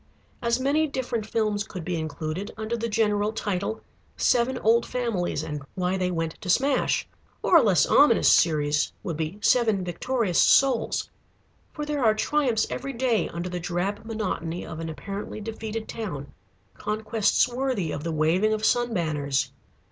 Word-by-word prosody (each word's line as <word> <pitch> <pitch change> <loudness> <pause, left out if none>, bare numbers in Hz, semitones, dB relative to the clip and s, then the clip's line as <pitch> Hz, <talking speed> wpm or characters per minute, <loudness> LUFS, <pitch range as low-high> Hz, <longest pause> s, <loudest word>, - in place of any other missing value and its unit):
As 235 +1 +1
many 290 +4 +2
different 245 -6 -3
films 215 -3 0
could 185 -5 -8
be 180 - -1
included 160 +3 -4
under 220 +2 -2
the 230 0 -3
general 210 -1 +1
title: 215 0 -3 0.4
"Seven 250 +1 +2
Old 230 0 +3
Families, 235 -8 -2
and 150 -1 -5
Why 185 0 0
they 185 -1 0
Went 165 -2 -3
to 185 - -6
Smash." 265 +7 +2 0.4
Or - - +4
a - - +7
less 200 -6 +4
ominous 280 -5 +5
series 150 -2 +2
would 165 - -3
be 160 +5 -3
"Seven 220 -3 +3
Victorious 200 +2 -1
Souls." 265 -4 +3 0.6
For 300 - -5
there 295 -3 -1
are 215 -2 +4
triumphs 245 -1 +1
every 275 +2 -4
day 240 -3 +1
under 170 +1 -4
the 180 0 -4
drab 180 +4 -2
monotony 190 -6 -3
of 160 - -7
an 165 0 -4
apparently 200 +7 -6
defeated 220 0 -5
town: 145 -11 -6 0.4
conquests 215 +1 +1
worthy 245 - -2
of 145 - -4
the 165 - -2
waving 165 +8 +2
of 215 0 -1
sun 240 -1 +2
banners. 150 -5 -1
210 Hz, 160 wpm, -26 LUFS, 175-235 Hz, 0.6 s, a